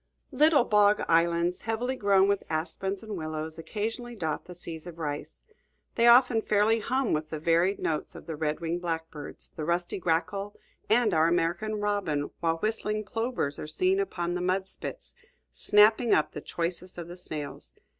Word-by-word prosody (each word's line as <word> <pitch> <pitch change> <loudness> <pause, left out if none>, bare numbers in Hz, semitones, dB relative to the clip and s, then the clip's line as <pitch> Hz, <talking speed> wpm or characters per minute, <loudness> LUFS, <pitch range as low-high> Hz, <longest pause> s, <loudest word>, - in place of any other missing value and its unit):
Little 295 0 +5
bog 210 0 +4
islands, 170 +1 +2
heavily 235 +4 -2
grown 200 -4 +4
with 200 -1 +1
aspens 185 +5 -2
and 215 -2 -5
willows, 155 -1 -5
occasionally 225 +6 -4
dot 160 -7 -3
the 180 - -10
seas 165 -1 -6
of 170 -2 -9
rice. 145 -3 -5 0.5
They 235 - +3
often 240 -1 +6
fairly 215 +2 +2
hum 255 +3 0
with 155 0 -1
the 155 - -4
varied 170 +5 +2
notes 155 - -2
of - - -10
the 165 - -5
red 150 +1 -2
winged 170 +1 -2
blackbird, 160 -3 -5 0.2
the 155 - -4
rusty 175 +3 -1
grackle, 185 +4 -1 0.3
and 220 -2 +4
our 160 0 +4
American 175 +6 0
robin, 195 -9 -1
while 165 -1 +1
whistling 215 +2 -1
plovers 225 - -2
are - - -5
seen 370 - +1
upon 175 - -2
the 180 - -2
mud 185 +1 0
spits, - - -8 0.4
snapping 220 +3 +4
up 155 - +1
the 150 - -7
choicest 175 +3 -4
of 170 -1 -6
the 175 - -8
snails. 155 -5 -6
180 Hz, 170 wpm, -28 LUFS, 165-215 Hz, 0.5 s, often